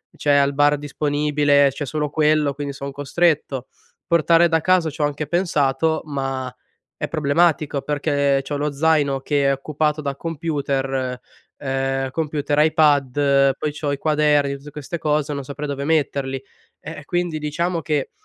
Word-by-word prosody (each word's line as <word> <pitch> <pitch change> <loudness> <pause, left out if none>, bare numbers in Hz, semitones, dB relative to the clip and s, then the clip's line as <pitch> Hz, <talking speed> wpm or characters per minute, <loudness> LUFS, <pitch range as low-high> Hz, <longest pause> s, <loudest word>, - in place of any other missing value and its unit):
c'è 145 - +1
al 140 0 +3
bar 145 +1 +3
disponibile, 145 0 +2
c'è 145 +2 -5
solo 150 +2 -2
quello, 150 -1 +2
quindi 140 0 -5
sono 140 +1 -6
costretto. 145 -2 0 0.4
Portare 170 0 +4
da 165 - +3
casa 180 0 +2
c'ho 150 0 -4
anche 145 +1 -3
pensato, 160 -2 +1
ma 135 -3 -3 0.4
è - - -3
problematico, 155 -1 +1
perché 140 -1 0
c'ho 145 +1 -3
lo 150 +1 -1
zaino 145 -2 +2
che 140 0 0
è - - +4
occupato 150 +2 -1
da 140 -2 -3
computer 135 -5 -2 0.4
ehm, 135 -1 -2
computer, 150 -2 -2
iPad, 145 -3 +3
poi 150 - -2
c'ho 145 -1 -3
i 140 - -1
quaderni, 150 -2 +2
tutte 145 +2 -12
queste 150 +3 -6
cose, 150 -1 0
non 140 -1 -4
saprei 145 +2 -6
dove 140 -1 -4
metterli, 140 -4 0 0.4
ehm, 160 -2 -8
quindi 175 -2 -1
diciamo 165 +3 -2
che 150 -2 -2
145 Hz, 150 wpm, -21 LUFS, 140-155 Hz, 0.4 s, Portare